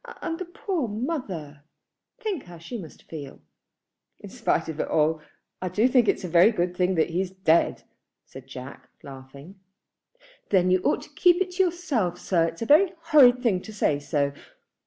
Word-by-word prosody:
And 330 0 -4
the 370 - -4
poor 350 - -3
mother; 205 - -5 0.6
think 420 - -4
how 175 -1 -12
she 170 +9 -9
must 165 -6 -12
feel." 145 -4 -9 0.8
"In - - -11
spite - - -1
of 160 -1 -6
it - - -1
all, 155 0 +1 0.4
I 185 - -2
do 215 +7 +2
think 250 -3 +3
it's - - +1
a - - -3
very 175 +5 +5
good 180 -3 -2
thing 180 +1 +1
that 165 +1 +1
he's 180 +2 -1
dead," 180 -3 +1 0.4
said 130 0 -13
Jack, 130 0 -10
laughing. 140 +7 -12 0.9
"Then 185 -2 +3
you 185 - +4
ought - - 0
to - - -14
keep 350 -1 +3
it 375 -1 -1
to 375 +1 +2
yourself, 285 - -1
sir. 170 -3 +1
It's 165 - -6
a - - -3
very 345 +8 +5
horrid 270 -6 +5
thing 195 -7 +1
to 220 - -10
say 155 -8 0
so. 145 -1 -1
185 Hz, 180 wpm, -25 LUFS, 160-260 Hz, 0.9 s, very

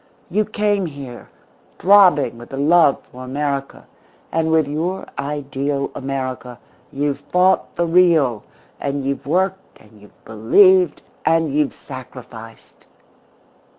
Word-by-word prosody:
You 215 0 +1
came 205 -3 0
here, 140 -5 -10 0.5
throbbing 180 - +4
with 120 - -12
the 135 - -7
love 150 0 +3
for 130 +1 -10
America; 140 +1 -4 0.5
and 160 0 0
with 160 -2 +2
your 170 +6 -3
ideal 140 -1 -3
America 130 -3 -5 0.3
you've 145 0 -2
fought 185 +1 +1
the 170 - 0
real, 165 -9 +3 0.4
and 140 -1 -3
you've 140 0 -3
worked 190 +4 -1
and 105 -1 -20
you've 105 - -21
believed 175 - +4 0.2
and 160 -3 +1
you've 150 -1 0
sacrificed. 125 -4 -12
145 Hz, 120 wpm, -19 LUFS, 130-175 Hz, 0.5 s, throbbing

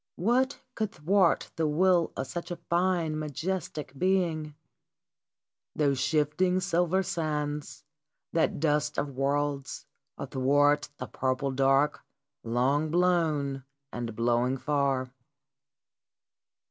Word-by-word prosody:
What 250 +8 +1
could 215 -4 -2
thwart 180 +3 +2
the 160 -1 +1
will 175 +2 +3
of 130 - -2
such 170 +5 -6
a 175 - -3
fine, 170 -2 0
majestic 155 -1 -4
being? 165 -3 0 1.2
Those 140 -3 +1
shifting, 155 +6 +1
silver 180 0 +1
sands, 150 -4 -3 0.5
that 165 -3 +1
dust 150 -1 +1
of 140 -2 -2
worlds, 140 -1 -1 0.3
athwart 145 +2 +2
the 125 - -5
purple 130 +2 -1
dark 135 +2 +2 0.4
long 130 +7 +1
blown 160 -6 +1 0.3
and 115 -2 -4
blowing 120 +3 +1
far 135 -2 0
150 Hz, 100 wpm, -28 LUFS, 135-175 Hz, 1.2 s, will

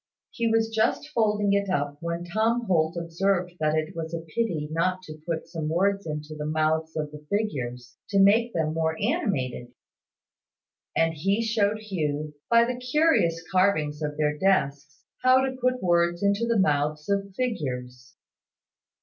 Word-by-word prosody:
He 235 -1 -1
was 225 0 +2
just 225 +6 +1
folding 210 -6 +1
it 200 -1 +1
up 145 -4 -1
when 170 0 -3
Tom 225 +6 0
Holt 165 -3 +1
observed 175 +2 0
that 155 0 +1
it 155 +1 -2
was 165 0 -4
a 165 - -4
pity 165 -2 -2
not 185 +3 0
to 155 -2 -10
put 165 -2 -3
some 160 -3 -4
words 195 +3 +1
into 150 0 -5
the 150 0 -5
mouths 160 +1 0
of 150 -1 -2
the 150 0 -11
figures, 125 - -3
to 200 - +2
make 220 +5 +5
them 160 -5 -1
more 160 0 0
animated; 130 - -1 1.2
and 165 0 +3
he 195 +8 0
showed 215 -2 +1
Hugh, 155 -8 -3 0.2
by 235 0 +6
the 250 +1 -3
curious 250 - +2
carvings 160 -6 +2
of 150 -1 -3
their 150 -1 +1
desks, 150 -5 0 0.2
how 255 +1 +5
to 260 -1 -3
put 255 -1 +1
words 175 0 +2
into 200 +3 +2
the 230 -1 +2
mouths 150 -4 +1
of 200 -1 -1
figures. 125 - -4
170 Hz, 160 wpm, -26 LUFS, 155-210 Hz, 1.2 s, by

